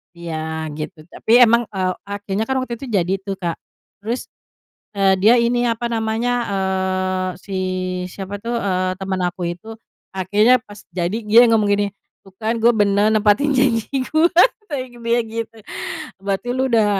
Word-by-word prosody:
Iya, 160 -2 -4
gitu. 155 +1 -6
Tapi 240 +3 +4
emang, 235 0 +5
eee, 185 -1 0
akhirnya 205 +1 -3
kan 265 - -1
waktu 235 -2 -5
itu 270 - -7
jadi 190 -5 0
itu 195 +1 -5
Kak, 175 -4 -4 0.4
terus, 230 +5 -4 0.6
eee, 195 -1 +3
dia 215 +5 +6
ini 240 0 +2
apa 235 0 -1
namanya, 225 +1 -1 0.2
eee, 190 -1 -1 0.2
si 195 - -7 0.5
siapa 195 +2 -7
tuh, 235 +4 -4
eee, 185 -4 0
teman 190 -1 -2
aku 180 +1 -5
itu, 220 +6 -8 0.4
akhirnya 210 +6 +3
pas 205 -3 -13 0.2
jadi 180 +3 -1
dia 225 +3 +7
ngomong 220 -2 +3
gini, 205 0 +1 0.4
tuh 195 - -17
kan 220 +1 -1
gue 235 - +7
benar 205 -1 +3
nempatin 215 +6 +3
janji 255 -5 +1
gue, 310 +5 +2 0.4
kata 290 - -2 0.2
dia 235 +1 +2
gitu, 225 0 -5 0.6
"Berarti 195 +4 -2
lo 260 +1 0
udah 225 -4 +3
210 Hz, 160 wpm, -20 LUFS, 190-235 Hz, 0.6 s, dia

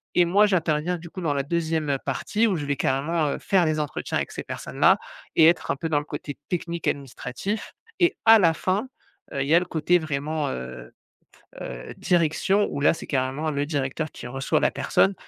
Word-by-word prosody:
et 175 - +5
moi 200 +5 +5
j'interviens 175 -3 +1
du 170 0 -11
coup 185 - -7
dans 155 -4 0
la 140 -1 -1
2e, 160 0 -1
heu, 135 - +1
partie 220 +2 0
où 200 - +1
je 145 - -4
vais 140 0 0
carrément, 150 +5 0
heu, - - -2
faire 190 -3 +2
les 155 -1 0
entretiens 150 -1 -2
avec - - -3
ces - - -6
personnes - - -7
là - - +6 0.4
et 160 - +7
être 170 +2 +3
un - - 0
peu 165 - -3
dans 150 -2 +2
le 145 - -8
côté 145 -2 -6
technique, 170 -1 -3
administratif 140 - -3 0.3
et 350 +1 +3
à 225 0 +9
la 165 -4 +4
fin, 190 +9 -1 0.4
heu, 140 - -1
il 135 - -1
y 155 - +5
a - - +7
le 180 - -4
côté 175 +1 +2
vraiment, 150 -1 -2
heu 65 - -7 0.7
heu, - - -7
direction, 175 +4 +2
où 140 - -4
là - - +5
c'est - - -9
carrément 135 +3 -1
le 145 -1 -1
directeur 145 +1 -2
qui - - -9
reçoit 135 +2 0
la - - +3
personne 195 - +2
155 Hz, 215 wpm, -25 LUFS, 140-175 Hz, 0.7 s, à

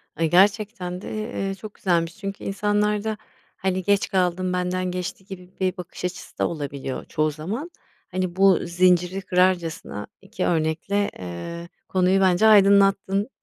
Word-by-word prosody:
Ay, 165 +1 0
gerçekten 190 -1 +2
de, - - -8 0.4
eee, 195 - -3
çok 210 +1 -10
güzelmiş 170 -3 0
çünkü 195 -1 -6
insanlarda, 210 +1 0 0.4
hani, 190 -1 -1
geç 200 +1 +2
kaldım, 180 -1 0
benden 180 0 -1
geçti 180 +1 -5
gibi 180 -2 -10
bir 185 +1 0
bakış 180 0 -7
açısı 180 0 -6
da - - +1
olabiliyor 140 -4 -5
çoğu 155 0 0
zaman. 205 - -5 0.4
Hani, 185 -1 -2
bu 195 -1 +5
zinciri 180 +1 +2
kırarcasına 180 - 0
2 - - -4
örnekle, 165 +5 0
eee, 170 - -7 0.2
konuyu 185 +1 +2
bence 190 +3 +4
aydınlattın 200 0 +4
185 Hz, 140 wpm, -24 LUFS, 175-195 Hz, 0.4 s, bu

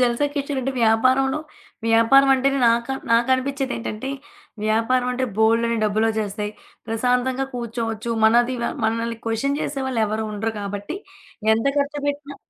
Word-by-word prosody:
జల్సా 245 +3 +2
కిషోర్ 285 -1 -2
అంటే 270 +2 -2
వ్యాపారంలో 255 +5 +3 0.5
వ్యాపారం 230 +5 +5
అంటేనే 275 +1 +1
నాకా 235 +3 +1 0.2
నాకనిపిచ్చేదేంటంటే, 260 0 0 0.5
వ్యాపారం 230 +4 +1
అంటే 260 +1 -1
బోలెడన్ని 230 +1 +2
డబ్బులోచ్చేస్తాయి. 215 -1 -1 0.3
ప్రశాంతంగా 250 +3 0
కూర్చోవచ్చు. 230 -1 -3
మనది 240 +3 +4 0.3
మనల్ని 230 +1 -1
క్వషన్ 275 +6 0
చేసే 275 -1 -3
వాళ్ళెవరుండరు 220 -2 -1
కాబట్టి, 205 - -5 0.6
ఎంత 225 +4 -1
ఖర్చు 285 +1 -1
పెట్టినా 285 0 -4
235 Hz, 110 wpm, -22 LUFS, 225-270 Hz, 0.6 s, వ్యాపారం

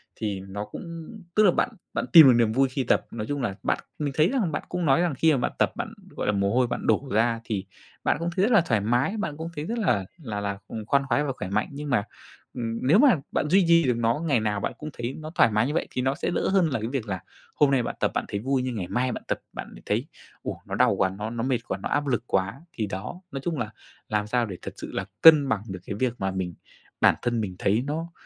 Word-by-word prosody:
thì 105 -3 -3
nó 100 +2 -6
cũng 165 +3 -8 0.3
tức 215 - +5
là 190 - +6
bạn 245 - +1 0.2
bạn - - -1
tìm 160 -4 +11
được 130 - +8
niềm 115 -2 +3
vui 135 +3 +3
khi 130 0 -2
tập. - - +2
Nói 110 -2 -5
chung 145 -1 -2
là 105 -5 -2
bạn - - +1 0.2
mình 145 -2 -1
thấy 155 +3 +5
rằng 235 -11 0
bạn 145 - -3
cũng 180 -2 -2
nói 135 +3 +4
rằng 175 -3 +1
khi 160 +4 +4
mà - - +2
bạn 125 - -1
tập - - +3
bạn, - - -5 0.2
gọi - - -2
là, 105 - +3
mồ 100 +1 +1
hôi 125 -1 +3
bạn - - -4
đổ 135 -1 +2
ra 115 +2 +2
thì 105 -4 -3 0.4
bạn - - +2
cũng 170 +1 -1
thấy 190 - +2
rất 230 - +3
là 215 -6 +6
thoải 115 -11 +1
mái, 120 - +1
bạn 160 -8 -3
cũng 165 +1 -5
thấy 150 - -4
rất 230 +7 -3
là 100 - +1 0.2
là 105 -4 -4
là, 100 -1 -2
ừm, 110 -2 -6
khoan 140 +3 +2
khoái 145 +5 +2
và 140 - -1
khỏe 95 - -6
mạnh. 105 +2 0
Nhưng 145 +1 -6
mà, 105 -7 +2 0.5
ừm, 115 -2 -3
nếu 175 +10 +6
mà 270 -6 +7 0.2
bạn 150 - 0
duy 190 +1 +5
trì 170 -1 +6
được 125 -2 +1
nó, 115 +4 +1
ngày 140 -7 +3
nào 105 -2 -1
bạn - - -2
cũng 155 - -6
thấy 120 +2 -4
nó 155 0 -7
thoải 115 - +5
mái 110 +4 +2
như 150 - -2
vậy - - 0
thì 125 - -2
nó 135 +2 +1
sẽ 170 - -2
đỡ - - 0
hơn 190 -4 +3
là 130 - -1
cái 110 - -3
việc 125 -5 -3
là 95 -2 -2 0.4
hôm 145 -2 +4
nay 130 -3 +3
bạn - - -4
tập - - +1
bạn - - 0
thấy 100 - -3
vui, 130 +3 0
nhưng 125 -2 -3
ngày 90 -5 -3
mai 125 +1 0
bạn - - -6
tập, - - -2
bạn - - -6
lại - - -13
thấy: - - -1 0.4
"Ô! - - -5
Nó - - -3
đau - - +4
quá, 95 - +3
nó 105 +3 -5
nó 115 0 -3
mệt 130 -2 +1
quá, - - -2
nó - - -5
áp 145 0 0
lực 120 -3 0
quá!" 100 +9 -1
Thì 110 - -2
đó, 100 - -6
nói 135 - -4
chung 165 -4 -1
là 110 -2 -2 0.4
làm 105 -1 0
sao 120 +2 +1
để 95 -4 -7
thật - - -7
sự - - -7
là 95 - -2 0.2
cân 155 -4 +8
bằng 105 -2 +1
được 95 -1 -5
cái 100 - -4
việc 130 -2 +1
mà 95 0 -1
mình, 95 -2 -3 0.5
bản - - +6
thân 120 -2 0
mình 95 -3 -4
thấy 105 +5 +2
nó 165 +3 -3
125 Hz, 290 wpm, -26 LUFS, 105-150 Hz, 0.5 s, tìm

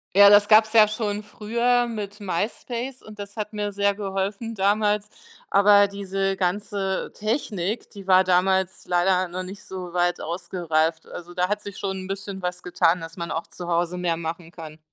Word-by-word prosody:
Ja, 200 0 +9
das 205 0 +6
gab's 220 0 +6
ja 215 -2 +7
schon 210 -1 -2
früher 235 +4 0
mit 210 -3 -6
MySpace 235 +7 -3
und 215 -1 -13
das 200 +1 -8
hat 210 0 -4
mir 205 -1 -3
sehr 200 0 +1
geholfen 200 +3 -3
damals, 210 +1 +1 0.4
aber 200 0 +6
diese 195 -1 -2
ganze 195 +1 -2
Technik, 215 -2 -2
die 200 -2 -11
war 185 0 +6
damals 190 0 +1
leider 180 +1 +2
noch 185 +2 -5
nicht 190 +2 -9
so 180 -2 -7
weit 175 0 0
ausgereift. 165 -1 -1
Also, 175 0 -9
da 180 0 +1
hat 210 0 -1
sich 205 -2 -9
schon 190 -1 -3
'n - - -7
bisschen 195 0 -5
was 180 0 -4
getan, 180 0 +2
dass 165 +2 -9
man 170 -1 -4
auch 165 - -3
zu 175 -1 -8
Hause 175 +1 0
mehr 170 -2 0
machen 165 0 -6
kann. 160 -3 -10
195 Hz, 180 wpm, -24 LUFS, 180-210 Hz, 0.4 s, Ja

